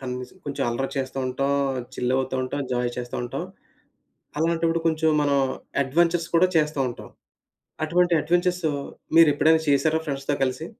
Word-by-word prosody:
కనీసం 125 +4 -6
కొంచెం 145 -1 -3
అల్లరి 135 +3 -2
చేస్తూంటాం. 135 +1 -1 0.4
చిల్ 125 +1 -1
అవుతూంటాం. 130 +1 -2
జాయ్ 125 0 0
చేస్తూంటాం. 120 0 -4 0.9
అలాంటప్పుడు 165 +1 +1
కొంచెం 160 0 +2
మనం 140 -1 +2 0.5
అడ్వెంచర్స్ 170 +4 +1
కూడా 185 +2 +5
చేస్తంటాం. 145 -5 -1 0.7
అటువంటి 175 +2 +2
అడ్వెంచర్స్ 175 +3 +1 0.5
మీరు 165 -2 +8
ఎప్పుడైనా 160 +2 +4
చేసారా 155 +3 +3
ఫ్రెండ్స్‌తో 140 -1 -2
కలిసి? 130 +4 -2
145 Hz, 115 wpm, -24 LUFS, 130-165 Hz, 0.9 s, మీరు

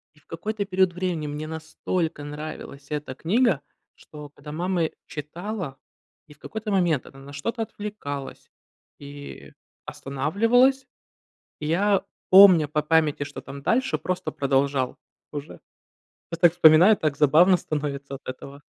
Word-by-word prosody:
И, - - -23
в - - -34
какой-то 205 +5 -3
период 185 -2 +2
времени 175 -4 -2
мне 150 +1 -5
настолько 160 0 -3
нравилась 145 -1 -8
эта 150 -3 -4
книга, 195 - +1 0.3
что 150 -1 -12
когда 145 +1 -11
мамы 175 0 -1
читала 170 0 -6 0.5
и 150 - -14
в 145 - -29
какой-то 220 -1 -6
момент 175 -8 +1
она 135 - -14
на 140 +1 -12
что-то 225 - -3
отвлекалась 200 -11 -7 0.5
и 145 0 -10 0.3
останавливалась, 230 - +1 0.7
я, 190 +6 +1 0.3
помня 185 -5 +8
по 150 +1 0
памяти, 150 -2 +2
что 145 0 -8
там 140 +1 -9
дальше, 260 +3 +1
просто 185 0 -3
продолжал 135 -1 0 0.3
уже. 145 0 -7 0.7
Я 165 - -4
так 170 -1 +5
вспоминаю, 175 +6 +7
так 155 -3 -1
забавно 165 +6 +5
становится 140 -3 -4
от 135 - -14
этого. 140 +2 -8
155 Hz, 135 wpm, -24 LUFS, 145-185 Hz, 0.7 s, помня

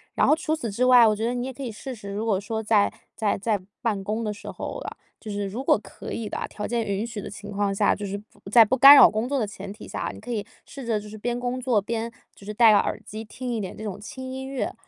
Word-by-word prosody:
然 - - +3
后 - - +5
除 320 -1 -1
此 235 -8 -4
之 245 +5 +1
外， 250 -2 +8
我 215 - +4
觉 220 +2 -2
得 240 - 0
你 245 0 -2
也 265 - -5
可 275 - -11
以 255 - -3
试 260 +5 -7
试， 205 -3 -9
如 210 +3 -3
果 205 -4 +1
说 220 +2 -4
在 210 -2 +3 0.2
在 210 -2 0
在 210 +1 0 0.2
办 215 -5 0
公 215 +3 -2
的 210 - -2
时 205 - -10
候 - - -5
啊， - - -6 0.2
就 220 - -9
是 205 0 -2
如 220 +7 -5
果 - - +4
可 195 - -9
以 225 - -4
的 - - -4
啊， - - -3
条 210 - -6
件 235 -1 -1
允 200 +3 -1
许 230 -3 -6
的 - - -7
情 205 0 -9
况 200 -1 0
下， 205 +1 +3
就 205 - -5
是 200 +1 -3
不 205 -1 -14
在 230 +2 +8
不 250 - +1
干 275 +3 +11
扰 - - +9
工 220 +3 -1
作 285 - 0
的 225 - +1
前 200 -1 -8
提 215 - -12
下 - - -6
啊， - - -2
你 - - -11
可 245 +3 -7
以 210 -3 -1 0.2
试 270 -3 -9
着 220 -2 +1
就 210 - -11
是 215 - -9
边 240 +3 -2
工 250 +1 -2
作 245 -5 +2
边 230 +2 -3 0.2
就 200 - -16
是 210 - -5
戴 225 +1 +6
耳 - - +2
机， 215 +1 -7
听 250 +3 -5
一 230 - -1
点 190 -3 -5
这 215 - -7
种 205 -2 -5
轻 260 +3 -8
音 265 0 -5
乐， 270 -2 -3
220 Hz, 325 characters per minute, -25 LUFS, 205-245 Hz, 0.2 s, 干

